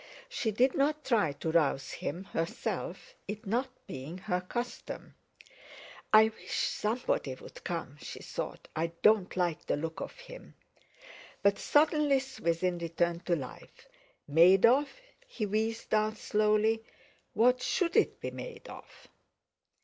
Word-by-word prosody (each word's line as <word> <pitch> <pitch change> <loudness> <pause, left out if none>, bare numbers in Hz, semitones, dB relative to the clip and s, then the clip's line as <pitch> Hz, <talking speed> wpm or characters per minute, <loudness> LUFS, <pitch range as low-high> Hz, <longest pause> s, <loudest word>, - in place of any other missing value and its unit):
She 250 - -1
did 250 +5 +3
not 300 +2 +1
try 210 - +2
to 160 +3 -3
rouse 150 -4 +2
him 175 +6 -4
herself, 165 -4 -4
it 210 +3 -6
not 240 +6 0 0.2
being 135 +7 -7
her 180 -1 -1
custom. 240 +7 -5 1.0
"I 220 0 +8
wish 220 - -10
somebody 210 - 0
would - - -13
come," 165 -5 -4
she - - -7
thought; - - -6
"I 160 +1 +1 0.2
don't 210 -4 +4
like 175 -3 0
the - - +1
look 160 +2 -4
of - - -6
him!" - - -12 0.9
But 200 0 +4
suddenly 295 -2 +3
Swithin 180 -9 -1
returned 170 +1 -1
to 175 - +3
life. 135 -6 -9 0.4
"Made 175 +7 +6
of" 270 +5 +4 0.4
he 240 - -3
wheezed 220 +3 -2
out 215 0 +2
slowly, 215 +2 +2 0.5
"what 250 +3 +4
should 340 +5 0
it - - +3
be - - -4
made - - -8
of?" - - -13
210 Hz, 135 wpm, -31 LUFS, 170-245 Hz, 1.0 s, I